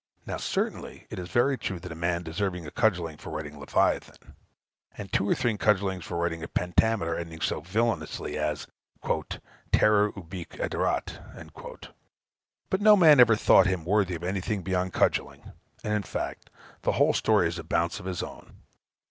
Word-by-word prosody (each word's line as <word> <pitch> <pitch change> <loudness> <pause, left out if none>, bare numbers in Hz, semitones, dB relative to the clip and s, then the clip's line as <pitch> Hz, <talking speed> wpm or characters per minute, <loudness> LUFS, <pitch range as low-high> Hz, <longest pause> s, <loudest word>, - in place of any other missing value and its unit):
Now, - - -4
certainly, - - -3
it - - -5
is 90 0 -6
very 125 +7 +2
true 95 -3 -4
that - - -9
a - - -4
man 85 +1 -1
deserved 90 +3 -2
a 80 -4 -7
cudgelling 85 -9 0
for - - -9
writing 75 -1 -6
Leviathan; 70 - -1 0.6
and 100 -2 -8
two 100 - +1
or - - +3
three 115 -3 0
cudgellings 95 -4 +1
for 85 - -4
writing 85 -1 -1
a 80 - -5
pentameter 90 -1 +1
ending 85 -1 -6
so 75 - -1
villanously 95 -5 -2
as 75 -1 -2 1.1
"terror 105 -1 +4
ubique 90 -2 -9
aderat!" - - -4 0.8
But 190 - +1
no 210 0 +8
man 155 -6 +7
ever 115 -3 +7
thought 105 - +5
him 95 -4 -1
worthy 95 -1 +1
of 85 - -8
anything 95 +2 -2
beyond 90 0 -1
cudgelling. - - 0 0.3
And, 105 - -1
in 105 - +1
fact, 100 - -5 0.3
the - - +1
whole - - +3
story 85 - +3
is 85 +1 -4
a - - -6
bounce 85 +1 -1
of 90 - -8
his 90 -4 -3
own. - - -10
90 Hz, 170 wpm, -27 LUFS, 85-105 Hz, 1.1 s, no